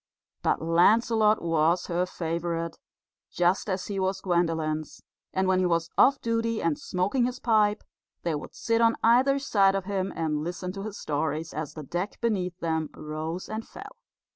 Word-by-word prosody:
But - - 0
Lancelot 215 +6 +4
was 165 +1 +2
her 175 +1 -1
favourite, 170 -1 -3 0.5
just 180 +4 +1
as 185 -1 -2
he 200 -2 -3
was 190 0 0
Gwendolen's, 165 -4 -1 0.3
and 190 0 0
when 185 0 +3
he 185 - +2
was 170 -1 0
off 275 0 +5
duty 230 -1 -1
and 160 -3 0
smoking 200 +8 0
his 250 0 -5
pipe, 215 -2 +2 0.4
they 170 - 0
would 150 - -6
sit 230 0 +1
on 230 0 +4
either 255 +4 +5
side 200 -8 +3
of 195 -2 -2
him 195 -1 -2
and 155 -2 -1
listen 180 +2 -4
to 195 +1 -7
his 210 0 -6
stories 155 +2 -2
as 155 -1 -5
the 155 - -6
deck 175 +8 -4
beneath 185 -6 -1
them 160 -2 -1
rose 155 +3 -5
and 220 +1 -5
fell. - - -10
180 Hz, 170 wpm, -27 LUFS, 165-215 Hz, 0.5 s, off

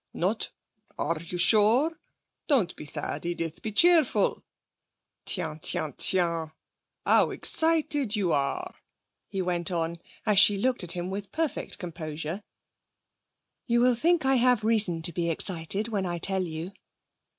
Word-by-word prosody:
'Not? - - -1 0.5
Are 165 -1 -2
you 170 +1 -6
sure? 220 - +4 0.5
Don't 255 - +1
be - - -10
sad, 145 0 -4
Edith. 170 -2 -4
Be 220 - -5
cheerful. 310 - +3 0.8
Tiens! 160 -5 -1
Tiens! 155 -3 +1
Tiens! 170 -3 +3 0.6
How - - +3
excited 305 -7 +1
you 190 -5 0
are,' 140 -2 -2 0.6
he 190 -1 -3
went 175 -2 -1
on, 170 -1 -3 0.3
as 210 -3 +4
she 205 -1 +6
looked 250 0 0
at 175 - +2
him 180 +1 -5
with 200 0 -6
perfect 320 -2 -3
composure. 165 0 -6 1.3
'You 235 -1 +2
will 250 0 +4
think 325 +5 +1
I 265 0 +3
have 245 -2 +2
reason 210 -7 +1
to 170 - +2
be 170 +1 -2
excited 180 +5 -1
when 200 -4 -2
I 175 0 -3
tell 190 +2 -1
you.' 165 +2 -6
190 Hz, 140 wpm, -26 LUFS, 170-235 Hz, 1.3 s, she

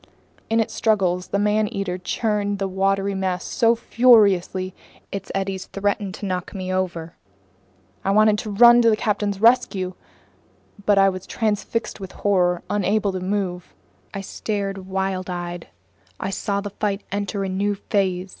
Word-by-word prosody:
In 225 +1 +2
its 225 - 0
struggles 185 -5 +1
the - - -1
man 210 +1 +2
eater 190 -3 -3
churned 205 +1 -1
the 195 0 -1
watery 195 +1 0
mass 190 -2 -2
so 235 -2 +2
furiously, 200 -7 +3 0.4
its 200 - -5
eddies 195 -1 -3
threatened 200 -1 -2
to - - -7
knock 185 +1 -3
me 185 -1 -3
over. 175 -3 -3 0.9
I - - -1
wanted 210 +1 +4
to 215 - -5
run 240 +3 +7
to 230 - +5
the 215 - +2
captain's 205 -2 -1
rescue. 205 -5 +3 0.9
But 205 -1 +5
I 195 0 +6
was 185 -1 -6
transfixed 220 +1 -2
with 190 -1 -8
horror, 180 -3 +1
unable 205 0 +1
to 185 - -4
move. 185 -2 -3 0.4
I 195 - -5
stared, 195 -1 -4
wild 190 -1 -2
eyed. 175 -1 -5 0.5
I 190 - -3
saw 200 +1 -2
the 205 0 -6
fight 205 0 -2
enter 200 0 -2
a - - -2
new 200 +2 0
phase. 190 -2 -1
195 Hz, 155 wpm, -22 LUFS, 185-210 Hz, 0.9 s, run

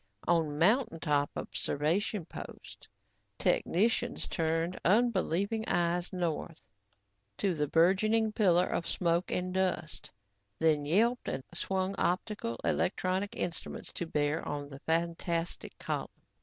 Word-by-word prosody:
On 160 -4 +2
mountain 210 - +3
top 145 -1 +1
observation 170 +6 -1
posts, - - -10 0.5
technicians 230 +6 +1
turned 165 +2 -1
unbelieving 205 0 +2
eyes 175 +1 +1
north 170 -3 -3 0.7
to 195 -3 +1
the 150 -2 0
burgeoning 215 +8 +3
pillar 180 -4 +4
of 170 - -2
smoke 170 0 +1
and 180 0 -1
dust, 185 -4 -1 0.5
then 155 -3 +2
yelped 230 +9 +2
and 135 - -3
swung 190 +2 -1
optical 180 - -1
and - - +2
electronic 190 +1 -1
instruments 170 - -4
to 170 - -4
bear 150 +1 0
on 145 -1 -4
the 135 -1 -9
fantastic 170 +1 -2
column. - - -3
175 Hz, 115 wpm, -31 LUFS, 160-195 Hz, 0.7 s, pillar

